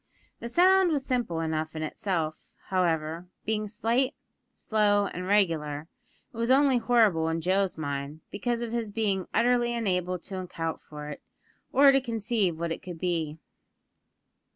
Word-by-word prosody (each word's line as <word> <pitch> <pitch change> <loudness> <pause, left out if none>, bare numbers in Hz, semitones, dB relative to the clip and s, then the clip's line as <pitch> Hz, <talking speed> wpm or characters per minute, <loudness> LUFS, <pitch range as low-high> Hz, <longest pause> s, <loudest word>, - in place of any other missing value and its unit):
The 235 - -5
sound 370 +7 +5
was 285 -4 -1
simple 240 - -1
enough 160 0 -2
in 155 - -3
itself, 160 -1 -3 0.2
however; 170 -2 0 0.2
being 215 0 -1
slight, 235 +6 0 0.4
slow, 205 -2 +2
and 180 -1 -5
regular, 160 -6 +1 0.4
and 230 - -8
was 230 +1 0
only 265 -1 +5
horrible 220 -9 +3
in 165 0 -1
Joe's 190 +2 +1
mind, 145 0 -4
because 235 +3 -2
of 230 - -4
his 230 -2 -2
being 200 -3 -1
utterly 240 0 +2
unable 185 -5 0
to 190 +2 -7
account 165 -3 -4
for 150 -1 -9
it, 145 - -8 0.5
or 275 0 +7
to 270 0 +3
conceive 225 -7 0
what 170 0 -2
it - - -4
could 175 -2 -8
be. 165 -3 -2
195 Hz, 155 wpm, -28 LUFS, 165-235 Hz, 0.5 s, or